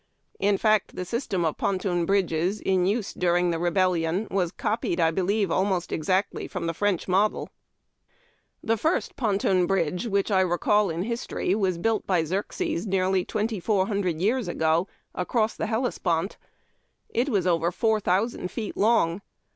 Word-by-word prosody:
In 200 Hz, 0 st, +2 dB
fact, 215 Hz, -1 st, +2 dB
the 180 Hz, -, -4 dB
system 205 Hz, -5 st, -2 dB
of 160 Hz, -, -1 dB
ponton 185 Hz, -3 st, 0 dB
bridges 190 Hz, 0 st, +1 dB
in 185 Hz, -1 st, +1 dB
use 210 Hz, +1 st, -1 dB
during 175 Hz, 0 st, +1 dB
the 165 Hz, -, -2 dB
Rebel 185 Hz, +2 st, +2 dB
lion 170 Hz, +5 st, -1 dB
was 180 Hz, -3 st, 0 dB
copied, 210 Hz, -4 st, -2 dB
I 165 Hz, -1 st, +3 dB
believe, 195 Hz, +2 st, 0 dB
almost 185 Hz, -1 st, 0 dB
exactly 185 Hz, +5 st, -1 dB
from 180 Hz, -4 st, -5 dB
the 165 Hz, -, -1 dB
French 200 Hz, 0 st, 0 dB
model. 195 Hz, +3 st, +1 dB, 1.1 s
The 225 Hz, 0 st, +1 dB
first 320 Hz, -, 0 dB
ponton 195 Hz, -5 st, +1 dB
Inidge 180 Hz, +2 st, 0 dB
which 200 Hz, 0 st, 0 dB
I 190 Hz, -1 st, +4 dB
recall 190 Hz, +3 st, +2 dB
in 165 Hz, +2 st, -2 dB
history 230 Hz, -4 st, -2 dB
was 190 Hz, -4 st, 0 dB
built 220 Hz, +4 st, 0 dB
!)}• 175 Hz, -4 st, +2 dB
Xerxes, 185 Hz, +1 st, -2 dB
nearly 190 Hz, -1 st, +1 dB
twenty 215 Hz, +1 st, -2 dB
four 190 Hz, 0 st, +1 dB
hundred 190 Hz, -6 st, -1 dB
years 225 Hz, +5 st, +1 dB
ago, 165 Hz, +1 st, +1 dB, 0.3 s
across 215 Hz, +4 st, 0 dB
the -, -, -3 dB
Hellespont. 205 Hz, -6 st, -1 dB, 0.7 s
It 245 Hz, +5 st, 0 dB
was 200 Hz, -7 st, +1 dB
over 170 Hz, -1 st, +2 dB
four 220 Hz, +3 st, +1 dB
thousand 195 Hz, 0 st, 0 dB
feet 220 Hz, +1 st, -5 dB
long. 205 Hz, -5 st, +2 dB
190 Hz, 160 wpm, -26 LUFS, 175-210 Hz, 1.1 s, I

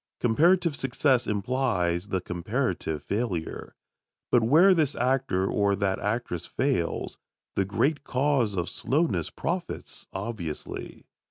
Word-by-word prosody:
Comparative 165 Hz, +7 st, +3 dB
success 135 Hz, -1 st, +1 dB
implies 100 Hz, -5 st, 0 dB
the 95 Hz, -3 st, -1 dB
comparative 90 Hz, -, -2 dB
failure. 100 Hz, -7 st, -3 dB, 0.6 s
But 120 Hz, -, +5 dB
where 160 Hz, +12 st, +6 dB
this 155 Hz, -5 st, +1 dB
actor 125 Hz, -7 st, +1 dB
or 100 Hz, 0 st, +2 dB
that 95 Hz, -1 st, 0 dB
actress 105 Hz, -5 st, -2 dB
fails, 130 Hz, -11 st, -1 dB, 0.4 s
the 95 Hz, -, +2 dB
great 140 Hz, +9 st, 0 dB
cause 130 Hz, -5 st, +1 dB
of 85 Hz, -1 st, -1 dB
slowness 155 Hz, +6 st, 0 dB
profits, 175 Hz, +1 st, -4 dB
obviously. 95 Hz, -6 st, -6 dB
115 Hz, 110 wpm, -27 LUFS, 95-135 Hz, 0.6 s, where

